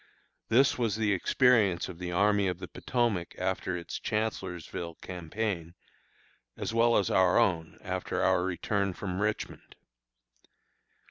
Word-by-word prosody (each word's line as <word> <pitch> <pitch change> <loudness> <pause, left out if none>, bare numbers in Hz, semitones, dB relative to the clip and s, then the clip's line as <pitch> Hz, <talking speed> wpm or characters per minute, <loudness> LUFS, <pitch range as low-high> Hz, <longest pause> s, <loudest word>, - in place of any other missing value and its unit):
This 130 +3 +4
was 115 -4 +1
the 105 -2 +1
experience 100 -3 +3
of 90 -2 -9
the 90 -1 -4
Army 100 +2 +3
of 90 -2 -1
the 90 -1 -7
Potomac 115 -8 -1
after 90 0 -1
its 85 - -6
Chancellorsville 90 -6 -3
campaign, 90 0 -4 0.8
as - - -3
well 115 +1 +4
as 100 - +1
our 95 -1 +4
own 85 -9 +1
after - - -2
our - - +3
return 100 +1 -1
from 95 +1 -4
Richmond. 105 0 -3
95 Hz, 130 wpm, -29 LUFS, 90-110 Hz, 0.8 s, This